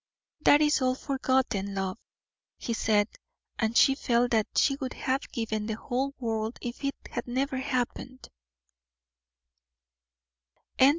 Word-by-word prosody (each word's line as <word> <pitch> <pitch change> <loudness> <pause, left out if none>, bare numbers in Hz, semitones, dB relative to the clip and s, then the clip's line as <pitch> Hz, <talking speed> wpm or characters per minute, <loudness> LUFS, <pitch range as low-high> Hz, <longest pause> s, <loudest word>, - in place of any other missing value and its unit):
"That 290 - +6
is 295 -1 +3
all 255 0 +2
forgotten, 260 -8 0
love," 190 -1 -2 0.6
he 230 - -3
said, 210 -2 +2 0.5
and 220 0 +1
she 270 - +7
felt 245 -2 +1
that 220 -2 +2
she 275 - +4
would 260 -3 -4
have 265 +1 -2
given 220 -3 -2
the 220 - -2
whole 265 +5 -2
world 225 -2 -2
if 240 +3 -6
it 275 0 -1 0.2
had - - -4
never 265 +2 -1
happened. 255 0 -3
245 Hz, 125 wpm, -28 LUFS, 220-265 Hz, 0.6 s, she